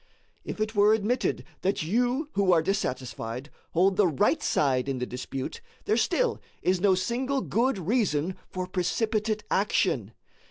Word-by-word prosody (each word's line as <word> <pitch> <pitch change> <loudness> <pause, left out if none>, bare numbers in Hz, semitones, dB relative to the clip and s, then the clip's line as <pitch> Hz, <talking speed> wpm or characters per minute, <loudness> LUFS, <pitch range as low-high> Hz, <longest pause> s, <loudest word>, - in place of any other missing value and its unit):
If - - -6
it 215 0 -1
were 210 +1 +5
admitted 220 +4 0 0.2
that 195 -3 0
you 245 - 0
who 195 -2 +3
are 165 -2 +4
dissatisfied 130 - -3 0.2
hold 185 +3 +3
the 205 -3 +5
right 165 +2 +2
side 135 -2 +1
in 135 - -1
the 125 - -2
dispute, 130 - -5 0.2
there - - +2
still - - +1 0.2
is 185 -1 +2
no 195 -1 +5
single 250 +9 -1
good 245 0 +1
reason 185 - 0
for 185 0 -3
precipitate 210 +4 -1
action. 160 - +1
190 Hz, 150 wpm, -27 LUFS, 155-220 Hz, 0.2 s, were